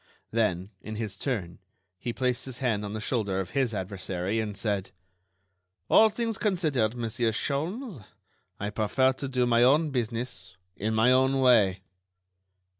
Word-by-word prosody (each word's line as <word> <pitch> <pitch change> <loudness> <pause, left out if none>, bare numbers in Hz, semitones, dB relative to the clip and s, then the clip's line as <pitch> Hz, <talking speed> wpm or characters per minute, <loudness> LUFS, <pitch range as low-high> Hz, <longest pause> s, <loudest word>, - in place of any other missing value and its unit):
Then, 100 -4 0
in 110 - -7
his 105 -3 -4
turn, 100 -8 -3 0.4
he 120 - -3
placed 125 0 -1
his 130 -3 -7
hand 115 -6 0
on 105 0 -5
the 110 - -3
shoulder 110 -5 -1
of 90 -2 -4
his 130 -4 +1
adversary, 95 0 -3
and 105 -2 -3
said: 100 -3 -1 1.0
"All 220 - +7
things 225 0 -2
considered, 155 - +1
Monsieur 115 0 0
Sholmes, 160 - -3 0.6
I 105 +1 -3
prefer 125 +5 +2
to 135 +1 -5
do 130 -2 +1
my 120 -1 +3
own 145 +5 +4
business 115 -7 -3 0.2
in 110 +2 -2
my 115 +3 +5
own 130 +1 +3
way." 105 -8 +4
115 Hz, 150 wpm, -28 LUFS, 105-130 Hz, 1.0 s, All